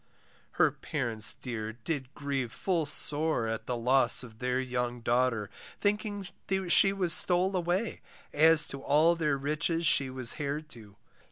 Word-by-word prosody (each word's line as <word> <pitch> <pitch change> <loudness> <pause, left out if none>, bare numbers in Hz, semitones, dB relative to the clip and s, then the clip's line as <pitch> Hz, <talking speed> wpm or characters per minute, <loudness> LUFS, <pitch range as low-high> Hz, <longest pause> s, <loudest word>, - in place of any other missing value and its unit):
Her - - +1
parents 110 -3 +1
dear 110 -3 -7
did 130 +3 -7
grieve 135 -4 -5
full 170 -2 -3
sore, 150 -4 +3
at 110 0 -6
The 125 - -3
loss 130 +3 +4
of 110 -3 -15
their 125 0 -2
young 125 -1 -5
daughter, 120 -3 -2 0.3
Thinking 205 -1 -3 0.4
she 195 +3 +5
was 185 -4 +3
stole 185 +3 +4
away, 180 +5 -3 0.3
as 155 0 +4
To 140 - -9
all 155 +5 +2
their 150 -4 -2
riches 155 +4 -2
she 140 -3 +3
was 130 -2 +1
heir 145 0 -4
to. 115 -10 -16
140 Hz, 150 wpm, -28 LUFS, 125-165 Hz, 0.4 s, she